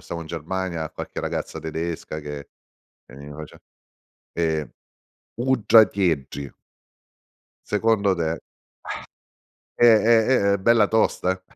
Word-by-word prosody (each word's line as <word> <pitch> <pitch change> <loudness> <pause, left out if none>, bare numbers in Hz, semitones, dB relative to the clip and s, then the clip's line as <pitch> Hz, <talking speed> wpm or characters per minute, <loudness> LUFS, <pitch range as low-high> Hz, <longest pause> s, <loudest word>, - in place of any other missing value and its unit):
stavo 85 - -6
in - - -11
Germania 85 +1 -4
a 80 - -5
qualche - - -7
ragazza 80 - -4
tedesca 80 0 -4
che 75 -1 -8 0.6
che - - -15
mi 70 +1 -10
face 75 +1 -11 0.7
ehm, 80 -3 -1 0.6
uddratieddri. 100 - +2 1.2
Secondo 105 -2 +2
te. 80 -1 -2 1.4
È - - +3
è 110 0 +5
è 115 -6 +3
è - - +1
bella 110 +1 +4
tosta. 95 -4 +1
90 Hz, 110 wpm, -23 LUFS, 80-110 Hz, 1.4 s, è